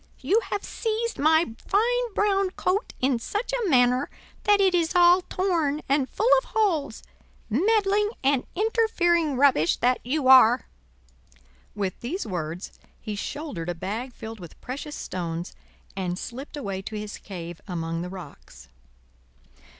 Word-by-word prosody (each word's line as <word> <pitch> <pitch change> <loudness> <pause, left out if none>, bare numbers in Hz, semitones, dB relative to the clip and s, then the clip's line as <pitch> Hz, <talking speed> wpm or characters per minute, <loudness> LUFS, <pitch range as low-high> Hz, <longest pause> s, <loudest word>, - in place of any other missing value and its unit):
You 425 - +3
have 405 - -2
seized 455 +1 -3
my 315 -3 +3
fine 475 +3 +1
brown 395 -2 +2
coat 375 +3 -2
in 255 -2 +2
such 415 - -3
a 475 -6 0
manner 250 -1 +3 0.4
that 410 -1 +5
it 385 -2 +4
is 340 0 +1
all 355 +1 +6
torn 335 -6 -1
and 275 -1 +1
full 440 - -1
of - - -13
holes, 330 - 0 0.5
meddling 410 - +2
and 270 -1 +2
interfering 345 - +2
rubbish 255 - +4
that 250 +1 +2
you 270 +2 -1
are!" 255 -2 +7 1.1
With 195 -3 -3
these 340 +12 -4
words 175 -2 -4 0.3
he 215 -2 -5
shouldered 205 - -5
a 175 - -2
bag 220 +9 -4
filled 225 -2 -9
with 175 -3 -12
precious 285 +4 -6
stones, 170 -1 -5 0.4
and 180 -2 -2
slipped 265 +8 -7
away 195 -8 -4
to 215 - -7
his 210 0 -6
cave 175 -3 -8
among 165 -2 -3
the 180 - -5
rocks. 180 -6 -12
280 Hz, 140 wpm, -25 LUFS, -, 1.1 s, are